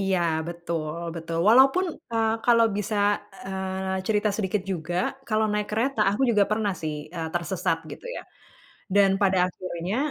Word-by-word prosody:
Iya 190 -1 +1 0.3
betul 170 -2 -4 0.2
betul 165 0 -5
walaupun, 270 +10 +6 0.3
eee, 225 -1 +2
kalau 230 -2 +5
bisa, 210 +1 -2 0.5
eee, 190 0 -3
cerita 210 -1 +2
sedikit 200 -1 -1
juga 170 0 -4 0.3
kalau 220 0 +2
naik 210 0 0
kereta 225 +3 0
aku 205 +7 -1
juga 210 -3 +4
pernah 215 -2 +1
sih, 155 -1 -2 0.2
eee, 165 -2 -3
tersesat 170 -1 0
gitu - - -9
ya, - - -6 0.7
dan 200 -1 +6
pada 195 -2 +3
akhirnya, 185 +1 -4
195 Hz, 150 wpm, -25 LUFS, 175-215 Hz, 0.7 s, walaupun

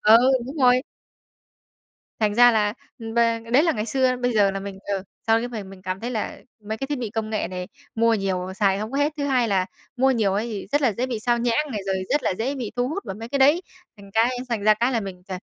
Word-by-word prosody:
Ờ, 220 +2 +7 0.3
đúng 280 +4 -7
rồi. 255 -2 +4 1.4
Thành 210 -1 +2
ra 245 +1 +7
là 210 -2 +2 0.4
và 230 -1 +3
đấy 280 +5 +6
là 330 - +3
ngày 215 -5 -3
xưa, 255 +2 +2
bây 245 0 0
giờ 205 -2 +4
là 195 0 -4
mình 195 -1 -7
ờ, 195 -1 -1 0.2
sau 225 0 +4
cái 240 +1 -3
mời 220 -4 -6
mình 190 -1 -12
cảm 185 +1 -4
thấy 240 +2 -3
là 220 -3 -3 0.2
mấy 215 +1 -4
cái 270 - -3
thiết 290 -1 -2
bị 230 -4 -4
công 220 -1 -3
nghệ 215 - -1
này 180 0 -6 0.3
mua 230 0 +3
nhiều 190 -2 -2
xài 195 -1 +2
hông 215 +4 -5
có 275 - -1
hết. 295 +1 +2
Thứ 285 - -2
hai 255 -4 +2
là 190 -2 +1 0.3
mua 265 +2 +4
nhiều 215 -6 +2
ấy 215 +4 -1
thì 210 -4 -5
rất 290 0 +2
là 240 -5 +3
dễ 245 +6 -2
bị 240 -4 -3
xao 240 0 +1
nhãng 245 +5 0
này 210 - -2
rồi 190 -1 0
rất 295 - +2
là - - +1
dễ 265 +5 -1
bị 240 -6 -5
thu 245 +1 +1
hút 395 +7 -4
vào - - -5
mấy 225 +3 -8
cái 280 +2 -1
đấy. 295 +7 +5 0.3
Thành 200 -1 -14
cái 235 +3 +2
thành 225 -4 -2
ra 215 0 +6
cái 240 +4 +1
là 230 - +1
mình 190 -3 -7
ch 190 - -5
230 Hz, 270 wpm, -24 LUFS, 205-255 Hz, 1.4 s, Ờ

